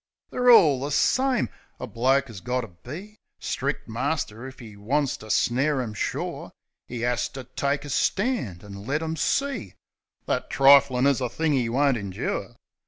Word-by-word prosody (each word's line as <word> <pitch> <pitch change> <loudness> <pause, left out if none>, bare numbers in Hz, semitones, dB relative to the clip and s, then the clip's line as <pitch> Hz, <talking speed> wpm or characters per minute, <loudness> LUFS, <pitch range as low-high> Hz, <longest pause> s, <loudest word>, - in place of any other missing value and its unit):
They're 250 0 +2
all 155 - +7
the 145 - -2
same! 260 - +2 0.3
A - - -4
man 130 +4 +2
'as 110 -7 -10
got 125 +3 -1
to 115 - -8
be 155 - -10 0.2
Stric' - - -3
master 115 +5 -3
if 130 - -12
'e 110 -4 -11
wants 135 +7 0
to 110 - -12
snare 130 +7 +2
'em 115 -4 -3
sure. - - -4 0.4
'E 120 -1 -3
'as 120 0 0
to 130 - -8
take 140 +3 -2
a - - -7
stand 195 - 0
an' 105 -1 -10
let 150 +4 -1
'em 160 0 -2
see 275 - -1 0.5
That - - -2
triflin' 135 -1 +5
is 140 -2 +3
a 125 - -1
thing 160 +2 0
'e 125 -4 +1
won't 135 +1 +2
indure. 100 -3 -4
130 Hz, 170 wpm, -25 LUFS, 120-150 Hz, 0.5 s, all